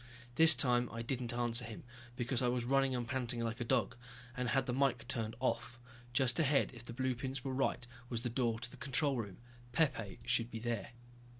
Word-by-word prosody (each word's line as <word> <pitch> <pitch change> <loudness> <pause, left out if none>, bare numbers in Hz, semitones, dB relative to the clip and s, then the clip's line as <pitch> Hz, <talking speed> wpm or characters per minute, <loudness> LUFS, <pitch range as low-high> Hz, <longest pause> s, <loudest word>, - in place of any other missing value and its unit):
This 160 +4 +9
time 125 -2 +3
I 115 0 -5
didn't 125 -1 -2
answer 120 0 +2
him, 110 -2 -8 0.3
because 125 +1 -1
I 125 - +2
was 120 -1 0
running 135 0 +2
and 120 -1 -3
panting 125 -2 -1
like 115 +1 -3
a - - +1
dog, 115 +1 +1 0.4
and 125 -2 -1
had 135 -1 +2
the 125 - -2
mike 125 -3 +1
turned 115 -4 -2
off. 120 -1 -1 0.3
Just 125 -1 +2
ahead, 145 -3 +3
if 120 -1 -10
the 120 - -8
blueprints 130 +1 -2
were 135 - -3
right, 130 -2 0 0.2
was 115 -2 -2
the 125 - -2
door 120 -2 0
to 120 - -6
the - - -12
control 140 0 +1
room. 100 -5 -5 0.4
Pepe 120 -9 0
should 115 0 +1
be 115 - -6
there. 115 0 -3
125 Hz, 205 wpm, -35 LUFS, 115-130 Hz, 0.4 s, This